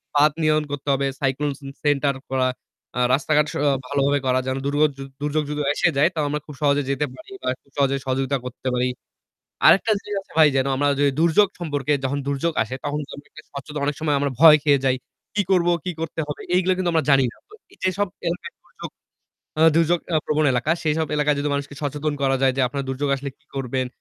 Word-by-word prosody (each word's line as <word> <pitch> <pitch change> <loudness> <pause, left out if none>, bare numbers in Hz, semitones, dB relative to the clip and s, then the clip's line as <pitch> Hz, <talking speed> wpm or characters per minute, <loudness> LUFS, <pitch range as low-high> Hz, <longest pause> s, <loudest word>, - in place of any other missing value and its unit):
বাধ 150 +1 +5
নিয়ম 155 0 +3
করতে 145 0 -6
হবে। 135 0 0
Cyclone 140 +2 0
ce 140 - -14 0.2
center 145 -1 +2 0.2
করা, 130 -1 +1 0.5
আ - - 0
রাস্তাঘাট 150 +2 +3
স - - -10
আ - - +5 0.2
ভালোভাবে 140 0 +1
করা 130 0 +2
যেন 130 +1 -1
দুর্গ 145 +1 0 0.2
য - - -16 0.2
দুর্যোগ 150 +1 0
যদি 150 0 -2
এসে - - +2
যায় 155 +5 +5
তাও 155 - 0
আমরা 150 +1 -1
খুব 150 - -10
সহজে 145 0 +3
যেতে 140 +2 0
পারি 130 - -14
বা 130 - 0
খুব 140 - -31
সহজে 140 -1 +2
সহযোগিতা 135 +1 0
করতে 125 +1 -7
পারি। 125 0 +1 0.8
আরেকটা 205 +3 +6
জিনিস 205 -1 -5
আছে - - -22
ভাই 155 -2 +8
যেন 135 0 +2
আমরা 145 +1 +2
যদি 140 -1 +4
দুর্যোগ 170 +5 +4
সম্পর্কে 145 -3 -1
যখন 140 +2 -1
দুর্যোগ 140 +4 0
আসে 110 +4 -6
তখন 145 +1 -2
কিন্তু 145 - -8
আমরা 145 - -14
একটা 155 - -13
স্বচ্ছতা 145 +2 -7
অনেক 145 -1 -1
সময় 150 -2 +1
আমরা 140 0 0
ভয় 160 -2 +10
খেয়ে 145 -2 +4
যাই। 130 -1 +3 0.4
কি 205 - +2
করবো, 175 -2 +3
কি 180 - -2
করতে 165 0 -3
হবে? 150 - -6
এইগুলো 185 +1 +3
কিন্তু 180 -2 0
আমরা 160 -3 +2
জানি 135 -1 +5
না। - - -20
তো 425 - -16 0.2
এইযেসব 185 +2 -1 0.2
এলাকায় 180 - -5
দুর্যোগ - - -10 0.7
আ - - +1 0.2
দুর্যোগ 170 +1 +3 0.2
আ - - +5
প্রবণ 155 0 +1
এলাকা 125 +5 0
সেসব 160 0 0
এলাকায় 150 -1 +2
যদি 145 +1 -1
মানুষকে 140 0 -4
সচেতন 145 +1 -2
করা 135 0 +2
যায় 130 -1 +4
যে - - +1
আপনার 140 +1 -3
দুর্যোগ 135 +2 -2
আসলে 140 +1 -5
কি - - -36
করবেন, 130 -1 -2
145 Hz, 220 wpm, -22 LUFS, 135-155 Hz, 0.8 s, ভয়